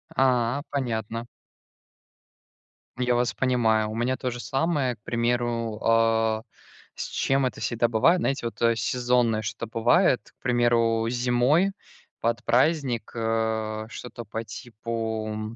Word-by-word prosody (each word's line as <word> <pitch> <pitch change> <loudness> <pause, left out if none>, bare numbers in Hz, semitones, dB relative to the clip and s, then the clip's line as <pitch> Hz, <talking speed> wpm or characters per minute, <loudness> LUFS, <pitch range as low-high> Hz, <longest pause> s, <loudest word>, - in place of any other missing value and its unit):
А, 125 0 +2
понятно. 115 -4 -3 1.7
Я 125 -1 +2
вас 120 0 +1
понимаю. 110 -4 +2
У 110 - -5
меня 125 +3 0
то 125 -2 -2
же 120 - -6
самое, 135 -2 0
к 105 - -40
примеру, 115 -2 -1
э, 115 -1 +3 0.5
с - - -4
чем 135 0 +1
это 125 - -3
всегда 120 0 +1
бывает. 120 +11 +3
Знаете, 135 -6 -1
вот, 115 - -9
э, 115 0 +4
сезонное 120 -2 +1
что-то 110 +2 -4
бывает, 120 +6 +2
к - - -66
примеру, 120 -2 +2
зимой 125 +10 +2 0.5
под 115 0 0
праздник, 130 -3 +1
э, 110 -1 -1
что-то 120 0 -8
по 110 +2 -5
типу, 110 -2 -5
120 Hz, 125 wpm, -26 LUFS, 115-125 Hz, 1.7 s, э